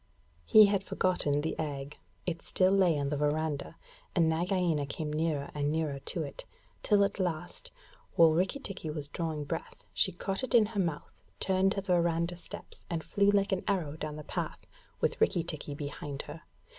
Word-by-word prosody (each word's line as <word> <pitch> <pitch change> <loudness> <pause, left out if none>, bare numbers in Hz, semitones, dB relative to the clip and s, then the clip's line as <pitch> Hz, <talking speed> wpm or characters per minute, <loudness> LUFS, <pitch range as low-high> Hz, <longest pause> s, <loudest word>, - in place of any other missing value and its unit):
He 215 - +9
had 200 -1 +1
forgotten 165 -7 +1
the 160 - -1
egg. 145 -2 -4 0.3
It 170 -2 -2
still 185 0 +2
lay 185 -5 +4
on 140 -1 -1
the 145 - -1
verandah, 150 0 -1 0.4
and 170 -3 +4
Nagaina 170 -2 +1
came 150 +1 -4
nearer 155 -2 -1
and 145 0 0
nearer 155 -3 -1
to - - -3
it, - - -7 0.4
till 205 -2 +4
at 200 0 -1
last, 175 -2 -3 0.5
while 165 -1 +7
Rikki 180 - +1
tikki 195 - -6
was 150 -2 -4
drawing 160 -3 -3
breath, 145 - -6
she - - +3
caught 195 +5 -3
it 260 -1 0
in 225 -2 +7
her 210 -1 -4
mouth, 165 -5 -3 0.2
turned 190 0 +2
to 195 - -2
the 190 -2 0
verandah 170 0 +1
steps 170 - -10
and 165 -2 -2
flew 200 0 +2
like 200 0 +3
an 190 - 0
arrow 175 -8 0
down 155 -1 -5
the 150 - -7
path, - - -4 0.4
with - - 0
Rikki 170 - +3
tikki 155 -3 -5
behind 145 -1 -5
her. 155 +2 -9
165 Hz, 185 wpm, -31 LUFS, 150-190 Hz, 0.5 s, He